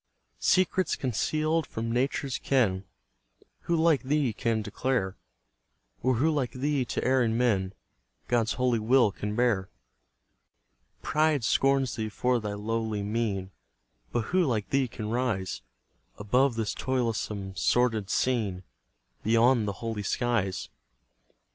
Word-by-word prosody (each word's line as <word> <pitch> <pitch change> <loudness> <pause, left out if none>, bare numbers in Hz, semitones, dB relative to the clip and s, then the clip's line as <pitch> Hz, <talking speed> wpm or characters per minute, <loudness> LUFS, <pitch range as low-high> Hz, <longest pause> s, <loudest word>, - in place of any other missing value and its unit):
Secrets 185 0 +2
conceal'd 155 +6 0
from 115 +1 -4
Nature's 130 +2 -1
ken, 100 -8 +1 0.8
Who 170 - +1
like 160 -3 +3
thee 140 -3 0
can 110 0 -1
declare? 115 -6 -1 0.9
Or 130 +1 +2
who 150 +8 +2
like 140 -5 -1
thee 140 0 0
to - - -3
erring 125 -3 +2
men 100 -6 +1 0.5
God's 120 -1 +1
holy 125 -2 +1
will 115 0 +4
can 105 +1 -4
bear? 110 -6 +1 1.3
Pride 155 -3 +2
scorns 135 +2 +2
thee 110 -1 -2
for 125 +3 +1
thy 105 -2 -4
lowly 110 0 -2
mien, 100 -3 -2 0.6
But 120 - 0
who 185 -1 +4
like 110 - -1
thee 135 -1 +2
can 110 -2 -6
rise 115 -7 -1 0.6
Above 125 +5 +2
this 110 -2 -1
toilsome, 110 -6 -2
sordid 110 -3 +1
scene, 105 -8 0 0.6
Beyond 115 +1 +3
the 100 - -1
holy 110 -2 -2
skies? 105 -3 -1
120 Hz, 125 wpm, -28 LUFS, 105-130 Hz, 1.3 s, will